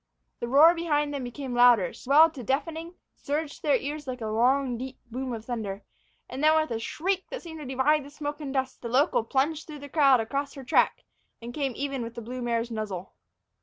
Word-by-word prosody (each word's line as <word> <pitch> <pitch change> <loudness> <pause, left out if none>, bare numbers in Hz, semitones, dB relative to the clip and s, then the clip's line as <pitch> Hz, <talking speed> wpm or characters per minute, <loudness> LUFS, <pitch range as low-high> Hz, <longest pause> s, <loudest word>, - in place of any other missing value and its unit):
The 235 - -3
roar 295 +7 +7
behind 295 -4 0
them 280 -2 -3
became 250 +1 -6
louder, 240 -7 +5
swelled 310 +5 +5
to 275 - -7
deafening, 325 - -2 0.2
surged 300 +1 -3
to - - -22
their 290 -2 +3
ears 295 +1 -4
like 255 -1 -4
a 225 - -5
long, 245 +4 +2
deep 260 +2 -6
boom 255 +2 -4
of 225 -2 -6
thunder. 215 -5 -4 0.4
And 265 +3 -5
then, 310 +1 +6
with 310 -3 -2
a 225 - -1
shriek 370 +10 -2
that - - -6
seemed 320 -2 -8
to 295 - -7
divide 270 +3 +2
the 280 - -11
smoke 295 0 -5
and 280 -2 -4
dust, 265 -1 -2
the 235 - -5
local 265 0 +3
plunged 290 +6 0
through 305 -2 -8
the 285 0 -10
cloud 275 -4 +5
across 280 +6 -3
her 275 - -8
track 255 - +2 0.4
and 235 +1 -8
came 275 -2 -1
even 275 -2 -3
with 230 0 -6
the 235 - -6
blue 250 +3 -6
mare's 235 0 -1
muzzle. 205 -5 -5
270 Hz, 220 wpm, -27 LUFS, 240-300 Hz, 0.4 s, roar